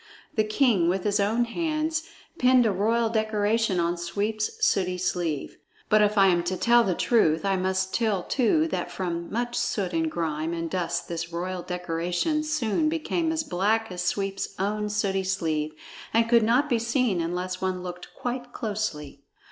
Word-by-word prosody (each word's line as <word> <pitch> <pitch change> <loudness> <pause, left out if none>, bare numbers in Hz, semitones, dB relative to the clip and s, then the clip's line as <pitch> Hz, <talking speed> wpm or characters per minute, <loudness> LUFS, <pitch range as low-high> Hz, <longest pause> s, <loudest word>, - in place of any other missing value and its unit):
The 215 - +2
king 215 -5 +2
with 185 +1 0
his 205 0 +1
own 220 +4 +2
hands 315 +4 -2 0.3
pinned 250 -1 +5
a 220 - +3
royal 225 +4 +1
decoration 215 -2 +1
on 170 +1 0
Sweep's 205 +6 -1 0.2
sooty 185 -2 +1
sleeve. 175 -5 -2 0.3
(But 215 0 +5
if 210 0 +2
I 195 - +7
am 175 -1 +3
to 185 +1 -1
tell 240 +3 +5
the 185 -5 0
truth, 160 -9 +2
I 195 -1 +2
must 190 0 -1
tell 215 -6 +1
too 295 +5 +2
that - - -2
from 170 -2 -4
much 240 +2 -2
soot 190 -6 -1
and 160 -1 +1
grime 160 0 -2
and 165 -1 -4
dust 170 -2 -2
this 170 0 -4
royal 180 +2 -3
decoration 180 - -1
soon 305 -1 0
became 325 +1 -1
as 320 -1 -1
black 215 +1 0
as 180 -1 -4
Sweep's 195 +1 -2
own 210 +2 -1
sooty 200 -2 0
sleeve 155 -5 -1 0.4
and 230 0 +4
could 235 0 +5
not 240 +7 +3
be 240 -5 +1
seen 235 -5 +1
unless 180 +2 -3
one 185 -1 -2
looked 180 -1 -8
quite 245 0 -4
closely.) 195 -11 -4
200 Hz, 170 wpm, -26 LUFS, 175-230 Hz, 0.4 s, I